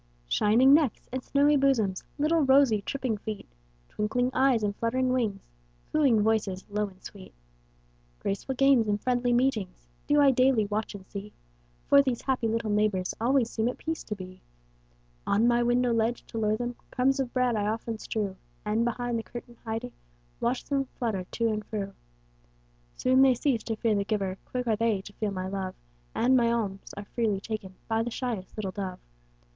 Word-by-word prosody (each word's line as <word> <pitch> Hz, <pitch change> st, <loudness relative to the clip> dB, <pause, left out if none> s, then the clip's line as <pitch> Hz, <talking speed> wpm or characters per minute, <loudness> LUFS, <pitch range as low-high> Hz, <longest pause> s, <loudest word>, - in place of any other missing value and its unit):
Shining 230 Hz, -, +5 dB
necks 290 Hz, -6 st, +2 dB
and 260 Hz, 0 st, -3 dB
snowy 290 Hz, +1 st, +3 dB
bosoms, 230 Hz, -9 st, +1 dB
Little 310 Hz, +3 st, +2 dB
rosy, 265 Hz, -6 st, +4 dB
tripping 255 Hz, 0 st, -2 dB
feet, 215 Hz, -1 st, -6 dB, 0.4 s
Twinkling 245 Hz, +4 st, -1 dB
eyes 260 Hz, -4 st, +3 dB
and 205 Hz, -1 st, 0 dB
fluttering 255 Hz, +3 st, 0 dB
wings, 220 Hz, -6 st, -1 dB, 0.4 s
Cooing 265 Hz, -9 st, +4 dB
voices, 210 Hz, -4 st, 0 dB
low 210 Hz, 0 st, 0 dB
and 185 Hz, -1 st, -17 dB
sweet, 195 Hz, -, -11 dB, 0.8 s
Graceful 200 Hz, -, -3 dB
games 270 Hz, -4 st, +4 dB
and 205 Hz, 0 st, +1 dB
friendly 245 Hz, +1 st, +1 dB
meetings, 240 Hz, -, 0 dB, 0.2 s
Do 295 Hz, -, +4 dB
I 280 Hz, -1 st, +6 dB
daily 255 Hz, -3 st, +3 dB
watch 210 Hz, +1 st, -3 dB
and 190 Hz, -2 st, -10 dB
see. 200 Hz, +2 st, -8 dB, 0.5 s
For 280 Hz, -, +7 dB
these 260 Hz, -4 st, -2 dB
happy 255 Hz, -4 st, 0 dB
little 225 Hz, -1 st, -1 dB
neighbors 205 Hz, -3 st, +1 dB
Always 245 Hz, 0 st, +2 dB
seem 225 Hz, 0 st, 0 dB
at 250 Hz, -, -2 dB
peace 320 Hz, 0 st, -4 dB
to 210 Hz, -, -4 dB
be. 185 Hz, -1 st, -10 dB, 0.9 s
On 225 Hz, +4 st, +3 dB
my 240 Hz, 0 st, +3 dB
window 240 Hz, 0 st, +2 dB
ledge, 230 Hz, +1 st, 0 dB
to 225 Hz, -, -4 dB
lure 215 Hz, 0 st, +1 dB
them, 240 Hz, 0 st, -4 dB
Crumbs 265 Hz, +2 st, +1 dB
of 260 Hz, -3 st, -1 dB
bread 250 Hz, -2 st, +1 dB
I 205 Hz, -1 st, 0 dB
often 225 Hz, +1 st, -3 dB
strew, 205 Hz, -4 st, -3 dB, 0.3 s
And, 215 Hz, +2 st, +1 dB
behind 240 Hz, 0 st, -1 dB
the -, -, -5 dB
curtain 240 Hz, 0 st, -10 dB
hiding, 225 Hz, +2 st, -4 dB, 0.5 s
Watch 245 Hz, +2 st, -1 dB
them 275 Hz, -1 st, 0 dB
flutter 215 Hz, -7 st, -2 dB
to 230 Hz, +4 st, -1 dB
and 215 Hz, -1 st, -2 dB
fro. 200 Hz, -2 st, -4 dB, 1.0 s
Soon 260 Hz, +1 st, +4 dB
they 265 Hz, -2 st, +6 dB
cease 245 Hz, -2 st, 0 dB
to 225 Hz, -, -2 dB
fear 220 Hz, 0 st, +1 dB
the 200 Hz, -1 st, +1 dB
giver, 195 Hz, -3 st, -2 dB
Quick 250 Hz, -1 st, -3 dB
are 225 Hz, -2 st, +2 dB
they 220 Hz, -3 st, +1 dB
to 205 Hz, -, -11 dB
feel 215 Hz, +1 st, -2 dB
my 185 Hz, -1 st, -4 dB
love, 190 Hz, -1 st, -4 dB, 0.4 s
And 255 Hz, +2 st, +3 dB
my 235 Hz, -2 st, +4 dB
alms 200 Hz, -4 st, -3 dB
are 205 Hz, -, -6 dB
freely 215 Hz, -3 st, -1 dB
taken 200 Hz, -3 st, -6 dB
By 225 Hz, 0 st, +1 dB
the 235 Hz, -, -2 dB
shyest 230 Hz, -6 st, -4 dB
little 200 Hz, -3 st, -3 dB
dove. 185 Hz, -2 st, -5 dB
230 Hz, 185 wpm, -28 LUFS, 210-255 Hz, 1.0 s, For